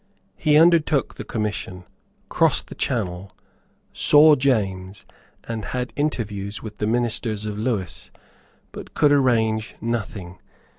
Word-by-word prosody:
He 150 -1 +3
undertook 160 -4 +3
the - - -8
commission, 105 -4 -4 0.4
crossed - - +1
the - - -7
Channel, 95 -5 -3 0.6
saw 150 +1 +6
James, 100 -8 -1 0.4
and 115 -2 -5
had 125 +2 -4
interviews 105 -9 -3
with 105 -2 -9
the 105 - -1
ministers 115 -2 -1
of 105 -1 -4
Lewis, 105 -8 -3 0.6
but - - -10
could 145 - +4
arrange 115 -6 +1
nothing. 105 -6 -4
110 Hz, 115 wpm, -22 LUFS, 100-130 Hz, 0.6 s, saw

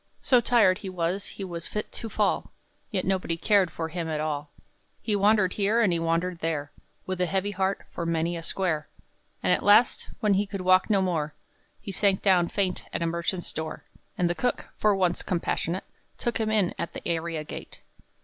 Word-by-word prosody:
So 250 -2 +4
tired 210 -6 +4
he 195 - -6
was 185 +2 -1
he 200 - -7
was 170 -3 -5
fit 210 - -4
to 225 - -5
fall, - - 0 0.4
Yet 190 -4 -1
nobody 185 -3 0
cared 195 0 +3
for 160 0 -4
him 165 -1 -3
at 155 -1 -1
all; 150 -1 -2 0.5
He 215 - -1
wandered 205 -2 +3
here, 210 +3 +2
and 210 -7 +4
he 170 - +1
wandered 165 +2 0
there, 155 -3 -2 0.3
With 185 -1 -3
a 180 - +2
heavy 195 +3 0
heart, 190 0 -1
for - - -4
many 165 +1 0
a 165 - -4
square. 165 -3 -1 0.5
And - - +4
at - - +1
last, 210 +4 +4
when 210 -3 +3
he 200 +1 +1
could 195 -1 -5
walk 185 +2 +4
no 200 -3 +3
more, 155 -5 -1 0.4
He 200 - -6
sank 195 0 +2
down 180 -3 +4
faint 185 -1 -1
at - - -2
a - - +1
merchant's 170 +2 -2
door. 160 0 -5 0.3
And 180 - +2
the 175 - +1
cook 245 +7 -2
for 210 -1 +3
once 180 -2 +1
compassionate 175 0 -1 0.3
Took 240 -1 -1
him 220 -1 0
in 210 -5 +2
at 170 - -3
the - - -6
area 165 -2 -1
gate. - - -9
185 Hz, 200 wpm, -27 LUFS, 170-200 Hz, 0.5 s, So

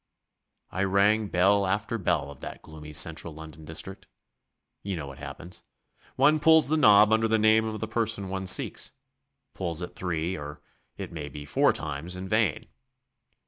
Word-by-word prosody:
I 95 - -1
rang 100 +3 +2
bell 100 +2 +3
after 105 +4 -2
bell 80 -6 -1
of 70 - -13
that - - -9
gloomy 75 -1 -11
central 80 +1 +1
London 80 0 -11
district. 80 +5 -6 0.7
You 100 -1 -4
know 75 -4 -5
what 70 +1 -11
happens. 75 +5 -8 0.5
One 155 +1 +4
pulls 160 -1 +6
the 155 - +2
knob 105 -7 +6
under 110 0 +2
the 110 0 +2
name 110 +1 +4
of 110 -1 -4
the 110 - -4
person 110 -2 -1
one 95 0 -4
seeks - - +2 0.6
pulls 85 -3 -3
it 90 -1 -6
three, 90 0 -2
or, 75 -1 -8 0.4
it - - -7
may 75 -3 -6
be, 75 -1 -9
four - - +3
times 80 +4 -5
in 95 +1 -6
vain. 105 -6 0
95 Hz, 170 wpm, -27 LUFS, 80-110 Hz, 0.7 s, pulls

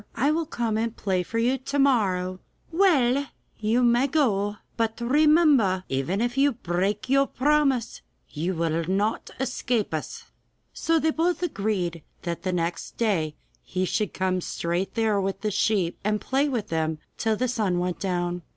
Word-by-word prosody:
I 275 +6 +2
will 320 0 -1
come 230 -7 -1
and 230 0 -2
play 190 -3 0
for 225 +6 -4
you 250 +3 +2
to 275 +2 -3
morrow.' 190 -9 +2 0.3
'Well, 285 -7 +3 0.3
you 225 +3 +2
may 240 +3 +4
go!' 210 -9 +1
they - - -15
said, - - -28 0.3
'but - - -11
remember 300 +1 +5
that 185 -1 0
even 135 +10 0
if 240 +2 0
you 280 0 +4
break 200 +2 -1
your 275 +1 +3
promise 275 -3 +1 0.3
you 170 +5 -3
will 165 0 0
not 200 +5 -1
escape 245 -6 -1
us.' 155 - -4 0.5
So 330 0 +1
they 320 0 +2
both 345 +3 0
agreed 195 - -1 0.2
that 170 -1 -3
the 185 - -1
next 170 -1 -3
day 170 -10 0 0.3
he 185 +1 -2
should 210 +2 -1
come 185 -1 -1
straight 175 +3 -2
there 220 -3 +2
with 195 0 -3
the 215 - -1
sheep, 190 -4 +1
and 210 +1 +1
play 275 +5 0
to 240 -6 -1
them 160 -2 -1 0.2
till 220 -1 +1
the 255 +4 0
sun 215 -7 0
went 180 0 -2
down. 175 -2 -1
215 Hz, 175 wpm, -25 LUFS, 185-265 Hz, 0.5 s, remember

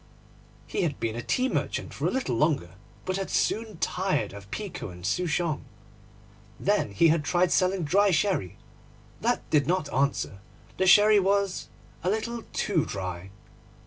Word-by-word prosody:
He - - -2
had 155 -6 -1
been 115 -1 -2
a 120 - -3
tea 255 - +1
merchant - - -2
for - - -1
a - - +2
little 255 - -1
longer, 140 - +1 0.3
but 185 0 -1
had 195 - -3
soon 220 -3 0
tired 180 - -1
of 100 -1 -11
pekoe 180 - -5
and 90 0 -10
souchong. 165 - 0 1.0
Then - - +1
he 160 +12 +5
had 160 -1 +2
tried 175 +3 +2
selling 185 -1 +2
dry 200 +7 +3
sherry. 155 - 0 0.6
That - - 0
did 150 -3 +3
not 175 -4 0
answer; 135 -7 0 0.4
the 190 - +3
sherry 210 +3 +7
was 195 0 0 0.3
a 180 - +1
little 225 +3 -2
too 175 -8 +1
dry. 95 -1 -5
175 Hz, 155 wpm, -27 LUFS, 120-195 Hz, 1.0 s, sherry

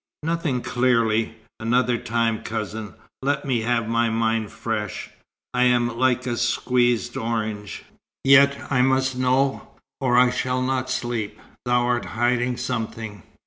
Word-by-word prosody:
"Nothing 160 -6 -1
clearly. 115 -3 +1 0.2
Another 120 +1 +1
time, 115 -1 0
cousin. 110 -1 -5 0.3
Let 140 +1 0
me 125 -4 0
have 115 -1 0
my 115 0 +1
mind 110 -1 0
fresh. 105 -3 -4 0.4
I 125 0 +3
am 120 -1 +2
like 130 0 +1
a 120 -2 -2
squeezed 120 0 +1
orange." 110 -3 -3 0.4
"Yet 140 +1 +6
I 130 -2 +3
must 130 0 +2
know, 130 +2 +1 0.3
or 125 -3 +2
I 125 0 +6
shall 125 0 -1
not 130 0 -1
sleep. 120 -4 -3 0.3
Thou 125 0 +3
art 120 0 0
hiding 120 +1 +1
something." 115 -4 -4
120 Hz, 135 wpm, -23 LUFS, 115-130 Hz, 0.4 s, Yet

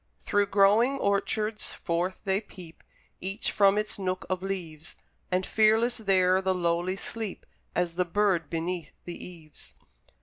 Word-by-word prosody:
Through 205 0 +2
glowing 210 +8 +4
orchards 210 0 -1
forth 175 +2 -2
they 195 0 +1
peep, 180 -6 -13 0.4
Each 195 +3 -3
from 200 0 +4
its 210 -1 -2
nook 185 -1 -2
of 185 -1 -1
leaves; 175 -5 -5 0.4
And 185 +1 +1
fearless 225 +2 +3
there 190 -3 +3
the 190 0 +1
lowly 175 +1 0
sleep, 215 0 -5 0.3
As 175 -1 0
the 180 +2 +1
bird 185 -2 +1
beneath 170 -1 -3
the 175 - -7
eaves. 165 -4 -13
190 Hz, 140 wpm, -28 LUFS, 175-205 Hz, 0.4 s, glowing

